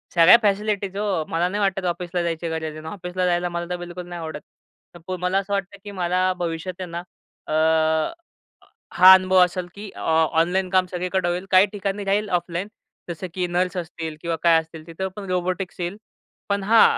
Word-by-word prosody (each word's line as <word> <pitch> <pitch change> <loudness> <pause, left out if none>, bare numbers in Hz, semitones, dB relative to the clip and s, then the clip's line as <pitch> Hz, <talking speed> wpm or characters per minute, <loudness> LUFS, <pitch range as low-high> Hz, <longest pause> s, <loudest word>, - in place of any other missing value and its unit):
सगळ्या 175 +7 +8
फॅसिलिटीज 205 -2 0
हो. 200 -6 0
मला 170 +2 +1
नाही 205 +2 -2
वाटत 195 -1 0
ऑफिसला 175 0 -2
जायची 165 0 -2
गरज 160 0 -3
आहे 155 - -10
अन् 155 - -10
ऑफिसला 180 0 -3
जायला 175 0 +1
मला 175 0 -3
तर 180 - -2
बिलकुल 175 0 -8
नाही 175 -1 -7
आवडत. 160 -2 -6 0.5
तर 175 - -11
पु 185 0 -3
मला 180 +2 0
असं 200 +1 -2
वाटतं, 200 0 -3
की 205 - -8
मला 185 0 +1
भविष्यात 175 +2 -4
आहे 180 - -5
ना. 170 +1 -4 0.5
अ, - - -3 1.4
हा 185 +1 +10
अनुभव 185 0 +4
असेल, 180 0 -5
की 205 0 -8
अ, - - -8 0.4
ऑनलाईन 185 +2 0
काम 185 0 +3
सगळीकडे 180 0 -1
होईल 180 +2 -2
काही 185 +1 +7
ठिकाणी 200 0 -3
जाईल 205 +1 +1
ऑफलाईन 175 +1 -2 0.4
जसं 170 +2 -5
की 180 -1 -1
नर्स 180 +1 -1
असतील 165 -2 -5
किंवा 170 -1 -1
काय 165 -1 +6
असतील 160 -1 -13
तिथं 180 +3 -4
पण 205 - -7
रोबोटिक्स 185 +1 -2
येईल 175 +3 -3 0.5
पण 200 -1 0
हा 220 +3 +6
180 Hz, 195 wpm, -23 LUFS, 175-195 Hz, 1.4 s, हा